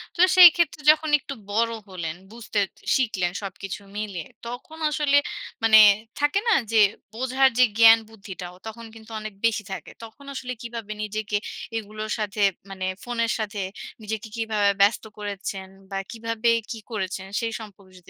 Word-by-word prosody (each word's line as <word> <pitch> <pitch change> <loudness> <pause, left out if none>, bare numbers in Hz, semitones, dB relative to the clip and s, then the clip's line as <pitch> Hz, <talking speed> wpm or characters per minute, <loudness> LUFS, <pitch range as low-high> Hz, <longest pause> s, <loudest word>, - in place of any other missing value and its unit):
তো - - -14 0.2
সেইক্ষেত্রে 340 -4 +7
যখন 310 0 -1
একটু 275 - -7 0.2
বড় 230 +2 +2 0.2
হলেন, 170 -3 -5 0.2
বুঝতে 215 -3 -2 0.3
শিখলেন 195 -9 0
সবকিছু 195 +1 -6
মিলিয়ে। 200 -6 -4 0.2
তখন 310 +7 -8
আসলে, 295 -1 +2 0.5
মানে 220 -1 +7 0.4
থাকে 295 +7 +2
না? 460 - +5 0.2
যে 225 - +4 0.3
বোঝার 260 +3 +3
যে 255 - +8
জ্ঞান 225 0 +9
বুদ্ধিটাও 190 -4 -9
তখন 230 +1 -8
কিন্তু 225 0 -14
অনেক 215 -1 -7
বেশি 220 -2 +1
থাকে। - - -6
তখন 255 +5 -12
আসলে 250 -1 -5
কীভাবে 230 -3 -7
নিজেকে 210 0 -2 0.4
এগুলোর 215 0 -6
সাথে, 210 0 -3 0.3
মানে 190 -1 -5 0.2
ফোনের 235 -1 -1
সাথে 210 -2 -3 0.4
নিজেকে 220 +1 -4
কীভাবে 215 -3 +1
ব্যস্ত 205 +2 +4
করেছেন? 200 -2 -5 0.2
বা, 195 - -4
কীভাবে 230 0 -1 0.2
কী 225 - -5
করেছেন? 190 -2 -4
সেই 230 -1 -2
সম্পর্কে 200 -3 -13
যদি 175 - -19
220 Hz, 150 wpm, -24 LUFS, 200-235 Hz, 0.5 s, জ্ঞান